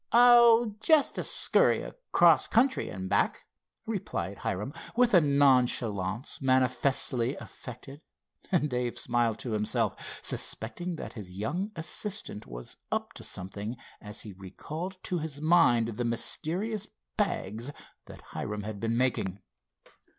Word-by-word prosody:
"Oh, 235 -2 +6
just 310 +2 +3
a - - 0
scurry - - +3
across - - +3
country, 255 +3 +2
and 95 0 -5
back," - - +1 0.4
replied - - -4
Hiram, 105 +9 -3 0.2
with 245 -1 +3
a 180 - +8
nonchalance 125 -7 +2
manifestly 130 -1 +1
affected, 135 +4 -10 0.5
and 165 -5 +2
Dave 125 -3 -2
smiled 120 -2 0
to 120 - -5
himself, 105 0 -1
suspecting 175 +10 -1
that - - -7
his 95 -5 -8
young 180 - -2
assistant 175 - -2
was - - -8
up - - -2
to - - -9
something 100 +5 -5 0.2
as 105 0 -6
he 105 - -9
recalled 155 - -7
to 180 - -1
his 150 -2 -5
mind 150 -8 +4
the 115 +2 -3
mysterious 180 - -2 0.3
bags 110 +8 -2 0.4
that - - -11
Hiram 105 -1 -4
had 105 -1 -6
been 115 +1 -1
making. 110 -7 0
125 Hz, 130 wpm, -29 LUFS, 110-175 Hz, 0.5 s, a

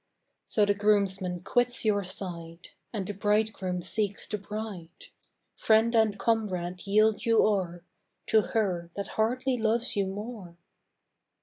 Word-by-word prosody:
So 210 - +2
the 205 - +2
groomsman 195 -3 +1
quits 245 +4 +1
your 205 -2 +2
side 175 -2 -6 0.2
And 205 -4 -3
the 205 - -4
bridegroom 205 -3 0
seeks 205 -1 -1
the 210 - -4
bride: 200 -5 -7 0.5
Friend 225 +1 +3
and 220 -3 +3
comrade 190 -5 -1
yield 215 +1 +3
you 230 -2 +4
o'er 180 -5 -1 0.4
To 220 - +4
her 185 -7 -1
that 200 - -4
hardly 250 +4 0
loves 230 +2 +1
you 200 -2 +1
more. 200 -3 -7
205 Hz, 130 wpm, -28 LUFS, 185-220 Hz, 0.5 s, you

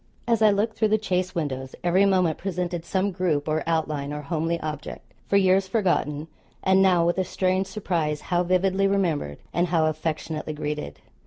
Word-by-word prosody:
As 230 -2 +2
I 215 - +7
looked 210 +2 +1
through 220 - +3
the 215 +1 +2
chaise 185 -3 -1
windows, 130 -5 -3
every 185 +3 +4
moment 185 -5 +2
presented 180 -2 -3
some 195 +2 0
group, 170 -6 -1
or 155 +1 0
outline, 155 -3 -1
or 150 0 -5
homely 165 +2 -1
object, 150 -1 -7
for 200 - +3
years 190 0 +3
forgotten; 170 -8 0 0.4
and 190 0 +4
now, 180 -3 +4
with 175 +2 +1
a - - +2
strange 185 +1 0
surprise 165 -8 -2
how 175 - +4
vividly 185 +2 +2
remembered 165 - 0 0.2
and 175 +2 +1
how 165 -2 +2
affectionately 155 0 -3
greeted! 150 - -5
175 Hz, 175 wpm, -25 LUFS, 155-190 Hz, 0.4 s, I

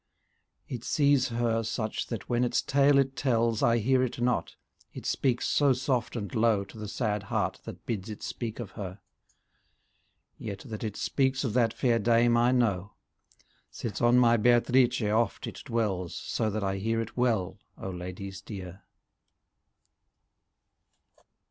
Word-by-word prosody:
It 120 -3 -6
sees 140 -2 +3
her 115 -1 0
such 110 -1 -3
that 115 -5 -5
when 120 0 +1
its 125 - +1
tale 140 0 +4
it 135 -1 +2
tells, 115 -4 +1
I 115 0 +4
hear 130 +3 +2
it 130 -1 -2
not, 120 0 0 0.4
it - - -8
speaks 125 -3 0
so 140 -2 +4
soft 125 -1 -1
and 105 -4 -4
low 110 -3 +3
To 100 +3 -13
the 105 - -5
sad 105 -1 -1
heart 100 - -2
that - - -9
bids 110 -2 -3
it 105 - -8
speak 115 -2 -5
of 115 -5 -6
her; 95 -2 -7 1.4
Yet 100 -3 -6
that 110 -4 -6
it 105 -2 -4
speaks 135 0 0
of 120 -6 -1
that 115 -2 +3
fair 120 -1 +1
dame 120 +2 +4
I 120 +1 +4
know. 100 -6 +1 0.8
Since 115 - -5
on 120 +1 +5
my 120 -1 +5
Beatrice 120 +2 +3
oft 110 +3 0
it - - -7
dwells. 105 - -1
So 110 - -2
that 105 0 -2
I 95 0 -1
hear 115 +3 -1
it 115 0 -4
well, 115 -7 0 0.2
O 95 - -5
ladies 90 +2 -7
dear. 95 -3 -8
115 Hz, 155 wpm, -28 LUFS, 105-125 Hz, 1.4 s, on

